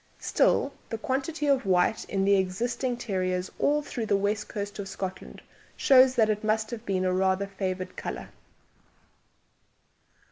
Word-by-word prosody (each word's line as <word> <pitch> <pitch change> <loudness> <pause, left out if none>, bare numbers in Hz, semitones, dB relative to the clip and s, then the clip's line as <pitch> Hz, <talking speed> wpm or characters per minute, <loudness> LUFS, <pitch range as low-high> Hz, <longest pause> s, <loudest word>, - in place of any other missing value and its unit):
Still, 275 - +2 0.2
the 225 - -3
quantity 275 +6 -2
of 275 -2 +3
white 185 +3 +2
in 195 -1 -1
the 200 0 +5
existing 235 +7 -1
terriers 185 -5 -2
all 295 +1 +2
through 235 -5 -4
the 200 - +3
west 205 +2 -1
coast 205 0 -5
of 200 - -4
Scotland 190 0 -6 0.3
shows 260 -2 +6
that 225 -3 +4
it 215 0 -1
must 220 +1 0
have 235 -2 -6
been 185 -1 0
rather 190 +1 +1
a - - -11
favoured 185 -1 -4
colour. - - -6
205 Hz, 150 wpm, -27 LUFS, 190-245 Hz, 0.3 s, shows